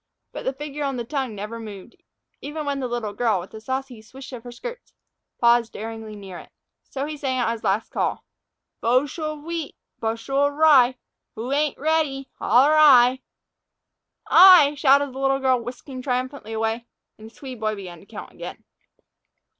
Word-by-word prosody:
But - - -8
the 265 - 0
figure 295 +1 -6
on 275 -2 -2
the 240 - -3
tongue 265 -4 -3
never 210 +3 -6
moved, 210 0 -10 0.5
even 300 +1 -5
when 280 -1 -2
the 260 - -2
little 235 -4 -3
girl, 220 -2 +1
with 180 +4 -10
a 220 - -9
saucy 260 -1 -4
swish 260 +5 -12
of 235 -2 -8
her 245 - -9
skirts, 485 - -9 0.4
paused 235 -1 +3
daringly 220 0 -7
near 195 -3 -9
it. - - -14 0.4
So 275 0 -3
he 305 +1 -5
sang 270 -3 -2
out 245 -2 +1
his 230 -1 -6
last 195 +3 0
call: - - -2 0.6
"Boshel 290 +6 0
of 295 - -15
wheat, 335 -2 -5 0.2
boshel 230 +5 0
of 285 - -4
raye, 280 -5 +5 0.4
Who 235 +4 -5
ain't 295 0 0
radey, 295 -3 0
holer 275 +5 +5
'Ay.'" 260 -4 +6 1.1
"I," 360 -6 +8
shouted 280 -1 +3
the 265 - -7
little 270 0 +2
girl, 260 -2 +1
whisking 255 +2 -8
triumphantly 255 -3 -3
away, 225 +2 -2 0.3
and 220 +1 -11
the - - -26
Swede 260 -4 -9
boy 215 -1 -1
began 180 -4 -9
to 195 - -19
count 210 0 -9
again. - - -9
255 Hz, 180 wpm, -23 LUFS, 225-285 Hz, 1.1 s, I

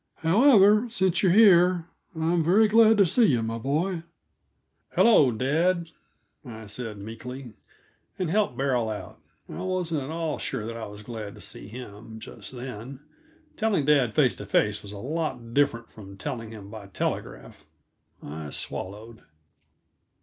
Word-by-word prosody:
However, 210 - +5
since 190 -6 +1
you 190 - +3
are - - +4
here, 180 -4 +5 0.3
I'm 165 +1 +1
very 200 +7 +4
glad 220 0 +5
to 200 - +6
see 205 +8 +4
you, 120 - +2
my 115 +1 -3
boy." 160 +8 -1 0.9
"Hello, 155 - +5
dad," 165 +8 0 0.5
I 110 -4 -9
said 105 +1 -6
meekly, 115 +4 -8 0.6
and 185 - -1
helped 200 - 0
Beryl 125 -4 0
out. 105 - -7 0.3
I - - -7
wasn't 180 -5 -2
at 135 - -6
all 160 -1 -3
sure 105 - -4
that 115 +1 -5
I 115 - -6
was 105 0 -11
glad 110 -3 -7
to - - -14
see - - -8
him, 110 -1 -10
just - - -10
then. 125 +1 -8 0.5
Telling 215 -10 0
dad 140 -6 +3
face 135 -5 +3
to 105 - -8
face 105 +1 +1
was 100 - -10
a 105 - -8
lot 130 -2 -4
different 115 -5 +1
from 100 -2 -12
telling 115 +3 -5
him 105 -3 -11
by 110 -3 -9
telegraph. 95 - -5 0.6
I 75 0 -7
swallowed. 105 +8 -6
130 Hz, 155 wpm, -26 LUFS, 110-175 Hz, 0.9 s, to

